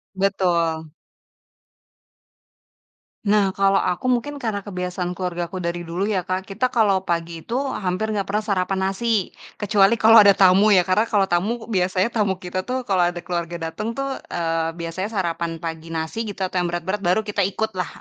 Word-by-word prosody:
Betul. 170 Hz, -5 st, 0 dB, 2.3 s
Nah 200 Hz, -2 st, +3 dB
kalo 195 Hz, 0 st, +3 dB
aku 185 Hz, +8 st, 0 dB
mungkin 250 Hz, +4 st, 0 dB
karena 205 Hz, -3 st, -3 dB
kebiasaan 180 Hz, -1 st, -3 dB
keluargaku 180 Hz, 0 st, -4 dB
dari 170 Hz, 0 st, -3 dB
dulu 175 Hz, +3 st, -3 dB
ya 185 Hz, -4 st, -1 dB
Kak, 185 Hz, +1 st, -1 dB
kita 200 Hz, +6 st, -1 dB
kalo 200 Hz, -5 st, +2 dB
pagi 170 Hz, -1 st, -2 dB
itu 235 Hz, -, -4 dB
hampir 220 Hz, -6 st, -1 dB
nggak 200 Hz, -2 st, -1 dB
pernah 210 Hz, +2 st, -1 dB
sarapan 195 Hz, -2 st, -1 dB
nasi, 215 Hz, -1 st, 0 dB, 0.2 s
kecuali 205 Hz, 0 st, +3 dB
kalau 225 Hz, 0 st, +7 dB
ada 200 Hz, -, +7 dB
tamu 195 Hz, +2 st, +5 dB
ya 180 Hz, -, +6 dB
karena 195 Hz, +5 st, +2 dB
kalau 200 Hz, -4 st, +1 dB
tamu 215 Hz, +7 st, 0 dB
biasanya 185 Hz, +2 st, +1 dB
tamu 205 Hz, -4 st, +1 dB
kita 185 Hz, +1 st, -4 dB
tuh 255 Hz, 0 st, -2 dB
kalau 185 Hz, -6 st, +2 dB
ada 175 Hz, -, -6 dB
keluarga 170 Hz, -2 st, -3 dB
dateng 220 Hz, +6 st, -4 dB
tuh, 275 Hz, 0 st, -3 dB
eee, 165 Hz, -1 st, -1 dB
biasanya 170 Hz, +3 st, -4 dB
sarapan 170 Hz, -2 st, -2 dB
pagi 165 Hz, 0 st, -6 dB
nasi 160 Hz, +8 st, -3 dB
gitu 200 Hz, -2 st, -6 dB
atau 185 Hz, -1 st, -1 dB
yang 175 Hz, -, +1 dB
berat-berat 175 Hz, +4 st, -2 dB
baru 195 Hz, +2 st, +1 dB
kita 205 Hz, -2 st, 0 dB
ikut 220 Hz, +3 st, -2 dB
lah, 180 Hz, -, 0 dB
190 Hz, 170 wpm, -22 LUFS, 175-210 Hz, 2.3 s, kalau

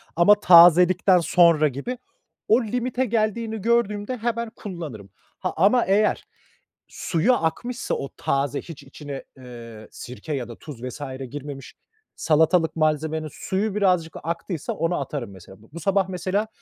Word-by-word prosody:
ama 205 Hz, +5 st, +5 dB
tazelikten 180 Hz, +1 st, +6 dB
sonra 170 Hz, -2 st, +4 dB
gibi, 150 Hz, -, -5 dB, 0.5 s
o 235 Hz, +3 st, +4 dB
limite 250 Hz, +3 st, -1 dB
geldiğini 220 Hz, -1 st, -1 dB
gördüğümde 230 Hz, 0 st, 0 dB
hemen 235 Hz, 0 st, -2 dB
kullanırım. 160 Hz, -, -8 dB, 0.3 s
Ha, -, -, -3 dB
ama 210 Hz, +8 st, +4 dB
eğer 205 Hz, +2 st, +1 dB, 0.6 s
suyu 180 Hz, +9 st, 0 dB
akmışsa, 240 Hz, +6 st, -2 dB
o 140 Hz, -, -5 dB
taze, 140 Hz, +1 st, -1 dB
hiç 165 Hz, -4 st, -11 dB
içine, 145 Hz, -2 st, -8 dB
eee, 115 Hz, -4 st, -11 dB
sirke 130 Hz, +5 st, -8 dB
ya 125 Hz, -4 st, -3 dB
da 120 Hz, -, -8 dB
tuz 135 Hz, -6 st, -10 dB
vs. 125 Hz, +3 st, -7 dB, 0.3 s
girmemiş 140 Hz, -2 st, -8 dB, 0.4 s
salatalık 160 Hz, +2 st, +2 dB
malzemenin 155 Hz, 0 st, 0 dB
suyu 200 Hz, +2 st, -2 dB
birazcık 180 Hz, -5 st, +1 dB
aktıysa, 170 Hz, 0 st, -4 dB
onu 165 Hz, +3 st, -1 dB
atarım 135 Hz, -9 st, -5 dB
mesela. 95 Hz, +2 st, -15 dB
Bu 110 Hz, -, -20 dB
bu 170 Hz, -, -7 dB
sabah 195 Hz, +3 st, +1 dB
mesela 190 Hz, +4 st, -2 dB
170 Hz, 135 wpm, -23 LUFS, 145-210 Hz, 0.6 s, tazelikten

